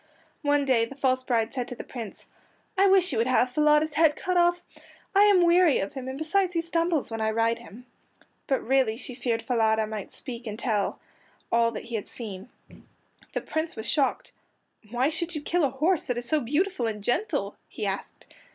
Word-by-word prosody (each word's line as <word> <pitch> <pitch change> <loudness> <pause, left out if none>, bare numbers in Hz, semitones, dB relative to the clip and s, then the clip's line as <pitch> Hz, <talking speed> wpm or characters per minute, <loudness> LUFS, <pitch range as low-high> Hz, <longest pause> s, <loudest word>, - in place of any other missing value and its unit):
One 290 -2 +2
day 245 -4 +3
the 270 - -11
false 260 -2 +1
bride 230 -3 0
said 250 -3 -3
to 245 - -6
the - - -7
Prince, 230 -6 -8 0.5
"I 390 +1 +4
wish 380 -3 +4
you 235 - 0
would 230 - +2
have 255 0 +2
Falada's 300 +2 +3
head 305 0 +4
cut 365 +2 -2
off. 350 0 +3 0.5
I 405 +1 +6
am 395 -4 +5
weary 345 -3 +5
of 195 - -3
him, 265 -2 -6
and 260 +1 -5
besides 360 +4 +1
he 335 - +1
stumbles 335 -5 0
when 225 0 -3
I 220 - +1
ride 230 +1 +1
him." 240 +5 -13 0.6
But 270 - 0
really 255 -4 +2
she 255 - -6
feared 240 -2 -2
Falada 220 -3 +2
might 215 -2 -6
speak 240 -3 -8
and 210 0 -5
tell 215 -4 -1 0.5
all 230 0 +3
he 235 - -7
had 215 -3 -3
seen. 210 -2 -7 0.8
The - - -1
Prince 315 +1 -3
was 220 0 -5
shocked. 280 -4 0 0.6
"Why 245 +5 +1
should 340 +2 -2
you 300 - -3
kill 345 +2 +1
a 280 - +3
horse 305 +7 +1
that 245 - -2
is 240 0 -2
so 310 - +2
beautiful 290 +1 0
and 210 -2 -4
gentle?" 245 - -1
he - - -5
asked. - - -5
260 Hz, 200 wpm, -26 LUFS, 230-320 Hz, 0.8 s, I